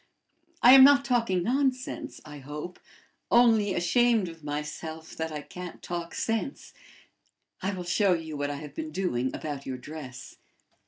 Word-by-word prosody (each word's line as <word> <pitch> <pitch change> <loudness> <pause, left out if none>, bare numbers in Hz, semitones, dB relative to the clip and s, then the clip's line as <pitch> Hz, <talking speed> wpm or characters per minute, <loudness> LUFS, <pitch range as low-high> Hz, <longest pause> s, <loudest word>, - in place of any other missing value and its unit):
I 245 - +10
am 265 -1 +10
not 280 0 +7
talking 230 -8 +1
nonsense, 255 +2 -1
I 150 -1 -9
hope, 150 +6 -7 0.5
only 225 -5 +4
ashamed 215 +3 +2
of 165 -2 -13
myself 155 +2 -6
that 160 0 -3
I 150 -1 -5
can't 180 +2 -9
talk 170 -1 -5
sense. 225 +5 -3 0.9
I 190 +1 -1
will 180 - -5
show 185 +2 +2
you 160 -2 -4
what 145 0 -2
I 145 - -3
have 145 0 -9
been 155 +1 -5
doing 150 -8 -1
about 145 -3 -6
your 130 -1 -3
dress." 130 -2 -9
170 Hz, 155 wpm, -28 LUFS, 150-225 Hz, 0.9 s, I